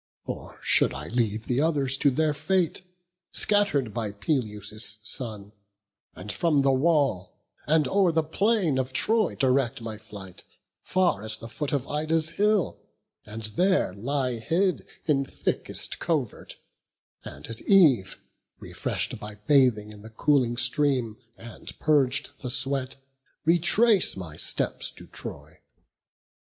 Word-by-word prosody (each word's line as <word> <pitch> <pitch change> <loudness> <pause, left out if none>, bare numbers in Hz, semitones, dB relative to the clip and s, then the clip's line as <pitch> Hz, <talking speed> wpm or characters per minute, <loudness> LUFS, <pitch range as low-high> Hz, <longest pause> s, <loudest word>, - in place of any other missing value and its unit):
Or - - -7
should - - +4
I 75 +3 -6
leave 115 -2 -1
the 125 +2 0
others 145 -5 +2
to 140 - +3
their 150 +3 +1
fate, 170 +4 0 0.5
Scatter'd 195 - +1
by 110 -3 -3
Peleus' 105 -2 -2
son; 110 -4 -4 0.6
and 100 +4 -6
from 150 -5 +1
the 135 - +4
wall 140 - +1 0.3
And 155 -2 +3
o'er 190 0 +3
the 160 0 +1
plain 180 - +1
of 130 0 -3
Troy 220 - +2
direct 130 -1 +1
my 110 -2 -7
flight, 100 -4 -11 0.4
Far 185 - +1
as 110 0 -2
the 115 - -9
foot 145 +5 -4
of 140 -2 -1
Ida's 155 +2 0
hill, 205 +1 +1 0.5
and 110 +1 -7
there 175 - +1
Lie 125 +3 -2
hid 175 - 0 0.2
in 140 -4 +2
thickest 135 - -2
covert; 150 -10 -3 0.7
and - - -9
at 115 -1 -6
eve, 145 - +4 0.4
Refresh'd - - -3
by 105 0 -7
bathing 125 -7 +3
in 105 -1 -11
the 110 - -11
cooling 120 0 +1
stream, 125 -5 +2 0.2
And 115 0 -9
purg'd 145 -2 +2
the 125 - -4
sweat, 135 0 +1 0.5
retrace 180 - +4
my 85 -5 -7
steps - - -1
to - - -12
Troy? - - -9
135 Hz, 135 wpm, -26 LUFS, 110-160 Hz, 0.7 s, should